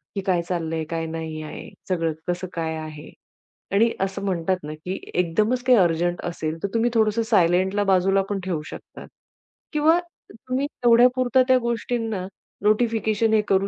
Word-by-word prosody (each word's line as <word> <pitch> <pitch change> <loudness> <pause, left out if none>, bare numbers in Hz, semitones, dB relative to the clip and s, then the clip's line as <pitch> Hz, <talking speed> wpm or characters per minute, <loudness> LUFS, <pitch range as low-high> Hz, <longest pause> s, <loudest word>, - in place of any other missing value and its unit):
की 195 - -1
काय 180 -3 +2
चाललंय? 165 -2 -2
काय 165 -1 -2
नाही 160 -1 -5
आहे, 155 - -8 0.2
सगळं 165 -3 0
कसं 180 +1 -2
काय 160 -1 -2
आहे? 155 -1 -8 0.6
आणि 225 +4 +4
असं 195 +1 -2
म्हणतात 185 -1 0
ना, 150 +1 -6
की 180 +5 -6
एकदमच 210 +8 +1
काही 255 -1 +5
अर्जंट 175 0 +1
असेल, 160 -2 -3
तर - - +1
तुम्ही 230 +1 +2
थोडंसं 220 0 +2
सायलेंटला 190 -1 +2
बाजूला 195 0 +3
पण 200 -1 -1
ठेऊ 170 -5 -2
शकतात - - -10 0.7
किंवा 315 +3 +4 0.3
तुम्ही 255 +5 -3
तेवढ्यापुरता 250 0 +4
त्या 260 -1 +5
गोष्टींना 225 -4 -2 0.4
नोटिफिकेशन 220 0 +2
हे 215 - +5
करू 195 0 +3
195 Hz, 155 wpm, -23 LUFS, 170-230 Hz, 0.7 s, काही